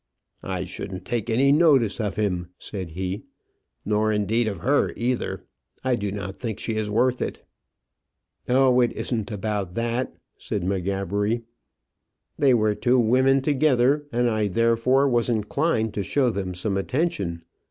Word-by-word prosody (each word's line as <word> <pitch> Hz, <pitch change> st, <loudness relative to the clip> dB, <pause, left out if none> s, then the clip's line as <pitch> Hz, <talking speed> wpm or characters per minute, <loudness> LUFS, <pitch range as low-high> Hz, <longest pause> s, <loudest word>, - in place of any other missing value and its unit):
"I 95 Hz, -2 st, -3 dB
shouldn't 95 Hz, +1 st, -7 dB
take 120 Hz, -1 st, -2 dB
any 130 Hz, +5 st, +4 dB
notice 140 Hz, -9 st, +4 dB
of 105 Hz, -2 st, -2 dB
him," 90 Hz, -5 st, -1 dB
said 95 Hz, -4 st, -6 dB
he; 95 Hz, +3 st, -3 dB, 0.6 s
"nor, 105 Hz, +1 st, +1 dB
indeed, 110 Hz, +2 st, +1 dB
of 100 Hz, -5 st, -4 dB
her 145 Hz, +3 st, +2 dB
either; 125 Hz, +1 st, -2 dB, 0.4 s
I 130 Hz, -1 st, +2 dB
do 105 Hz, -3 st, -3 dB
not 95 Hz, -1 st, -5 dB
think 115 Hz, -4 st, -4 dB
she 110 Hz, -, -3 dB
is 110 Hz, -1 st, -1 dB
worth 125 Hz, +4 st, +1 dB
it." -, -, -4 dB, 1.0 s
"Oh, 130 Hz, 0 st, +4 dB
it 120 Hz, -1 st, +3 dB
isn't 110 Hz, -5 st, -3 dB
about 105 Hz, -3 st, -3 dB
that," 120 Hz, +2 st, -2 dB, 0.2 s
said 100 Hz, -, -3 dB
M'Gabbery. 100 Hz, +4 st, -1 dB, 0.9 s
"They 135 Hz, -3 st, +4 dB
were 110 Hz, -2 st, +2 dB
two 125 Hz, +4 st, +2 dB
women 130 Hz, +4 st, +3 dB
together, 145 Hz, 0 st, +2 dB
and 120 Hz, 0 st, +1 dB
I 110 Hz, -2 st, +1 dB
therefore 115 Hz, +6 st, +2 dB
was 120 Hz, -2 st, +2 dB
inclined 110 Hz, +1 st, 0 dB
to 105 Hz, -, -2 dB
show 130 Hz, +4 st, +1 dB
them 95 Hz, -3 st, -4 dB
some 100 Hz, +2 st, -1 dB
attention. 100 Hz, -, -1 dB
110 Hz, 150 wpm, -24 LUFS, 100-125 Hz, 1.0 s, any